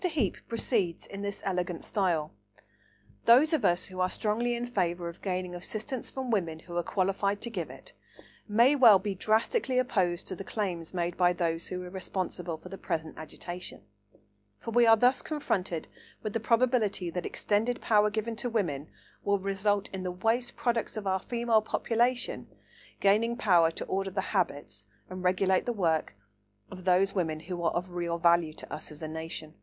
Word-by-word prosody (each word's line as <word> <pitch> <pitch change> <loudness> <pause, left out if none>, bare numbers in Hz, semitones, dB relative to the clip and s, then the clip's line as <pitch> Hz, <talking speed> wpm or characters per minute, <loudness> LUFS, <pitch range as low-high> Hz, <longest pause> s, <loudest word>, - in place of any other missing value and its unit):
Heape 310 - 0
proceeds 220 -6 -1
in 195 0 -8
this 200 0 -4
elegant 180 -2 -2
style: 175 -7 0 0.9
"Those 275 +8 +6
of 300 -7 +2
us 180 -1 +3
who 185 -1 -7
are 185 0 +2
strongly 235 +4 0
in 240 +1 -3
favour 180 -7 -1
of 170 - -11
gaining 185 -2 -2
assistance 220 +8 -4
from 260 -2 -4
women 170 -7 0
who 170 +2 -10
are 175 - +2
qualified 195 +3 0
to 235 - -4
give 180 -7 -3
it - - -12 0.5
may 235 +6 +5
well 235 -7 +8
be 195 +1 -3
drastically 225 - +1
opposed 185 -9 +1
to 185 - -5
the 195 - -7
claims 185 -6 -3
made 175 -1 -2
by 180 -1 +4
those 170 -2 -1
who 180 0 -4
are 180 - -7
responsible 180 -2 -4
for 160 - -12
the 195 - -8
present 160 -1 -3
agitation; 175 +3 -7 0.7
for 230 - -6
we 240 0 +5
are 225 0 +8
thus 250 +4 +4
confronted 190 - -2 0.4
with 215 -2 -3
the 230 - 0
probability 230 -6 +2
that 180 +1 -3
extended 225 +4 0
power 210 -1 +4
given 220 +2 -2
to 245 - -2
women 160 -11 -1 0.4
will 200 0 +2
result 200 +1 0
in 190 - -4
the 185 - -2
waste 225 +7 0
products 235 -2 -1
of 210 - -4
our 190 0 +1
Female 235 0 +1
population 240 +3 0 0.5
gaining 220 +4 +3
power 175 -7 +5
to 165 - -6
order 195 0 -1
the 190 +1 -1
habits 145 - -2 0.2
and 185 0 -5
regulate 185 +2 +2
the 240 - +1
work 165 - 0 0.6
of 185 -1 -9
those 190 +1 +3
women 160 -5 -1
who 175 +1 -5
are 170 - +2
of 180 +1 -3
real 170 -1 -2
value 170 -2 +3
to - - -8
us 155 - -5
as 150 +1 -10
a - - -2
nation" 160 0 -5
(italics - - -22
mine). - - -33
190 Hz, 185 wpm, -29 LUFS, 175-225 Hz, 0.9 s, well